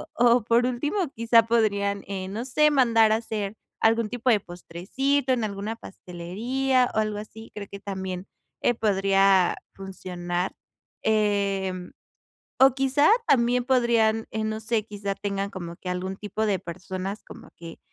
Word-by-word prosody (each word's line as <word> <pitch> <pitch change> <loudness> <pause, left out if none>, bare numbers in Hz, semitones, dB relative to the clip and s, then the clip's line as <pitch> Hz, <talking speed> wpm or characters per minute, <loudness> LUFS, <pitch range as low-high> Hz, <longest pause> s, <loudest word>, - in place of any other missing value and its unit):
o 240 -1 +4
por 235 +2 +3
último 255 +7 -2 0.2
quizá 230 0 +5
podrían, 200 -3 +1
eh, 190 -1 -4
no 220 +5 -4
sé, 300 +4 +3
mandar 230 -6 +4
a 220 - +4
hacer 215 -2 -4 0.3
algún 225 0 +3
tipo 245 +2 -1
de 215 - +4
postrecito 225 +11 -1
en 240 -3 -1
alguna 210 +1 -3
pastelería 235 +9 -1
o - - +2
algo 215 -1 -1
así. 220 +1 -10
Creo 205 -1 -6
que 200 - -8
también, 190 -1 -5 0.3
eh, 245 - +3
podría 195 -3 +3 0.2
funcionar. 180 -2 -4 0.5
Eh, 200 -3 +1 0.9
o 265 -1 +7
quizá 270 +2 +3 0.2
también 245 -1 +3
podrían, 235 -4 +2
eh, 220 - -2
no 215 0 -2
sé, 220 -1 -1
quizá 200 -2 -4
tengan 200 0 -3
como 170 -3 -7
que 185 - -8
algún 185 +1 -3
tipo 210 +2 -3
de 200 -3 +1
personas 185 +2 -6
como - - -13
que 165 -1 -10
215 Hz, 150 wpm, -25 LUFS, 195-235 Hz, 0.9 s, o